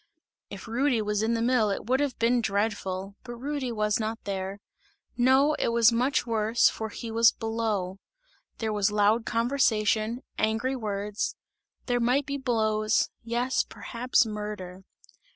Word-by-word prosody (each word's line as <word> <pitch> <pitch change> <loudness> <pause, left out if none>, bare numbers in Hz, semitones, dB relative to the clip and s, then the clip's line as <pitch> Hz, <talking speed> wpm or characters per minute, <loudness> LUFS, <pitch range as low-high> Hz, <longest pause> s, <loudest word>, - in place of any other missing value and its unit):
If - - -9
Rudy 245 +2 +1
was 210 -1 -1
in 225 +1 +1
the 230 - 0
mill 240 -3 +3
it 200 - -3
would 255 +3 +1
have 285 -3 -1
been 240 +1 +2
dreadful, 200 -2 -2
but 240 -1 -7
Rudy 270 0 -3
was 210 -1 0
not 220 +1 -2
there; 195 0 -4 0.6
no, 265 +4 +4
it - - +1
was 235 0 +5
much 245 +3 +1
worse, 225 0 +3
for 220 0 -5
he 225 +2 -7
was 230 0 +5
below. 220 -5 -2 0.6
There 220 -1 -2
was 205 -1 +2
loud 210 +2 +2
conversation, 230 -1 +1 0.2
angry 225 +5 0
words; 210 -3 -3 0.5
there 245 -1 +1
might 250 +4 +2
be 280 0 -3
blows; 215 -4 +1
yes, 240 +2 0
perhaps 245 +1 0
murder. 210 -4 -6
225 Hz, 150 wpm, -27 LUFS, 210-245 Hz, 0.6 s, was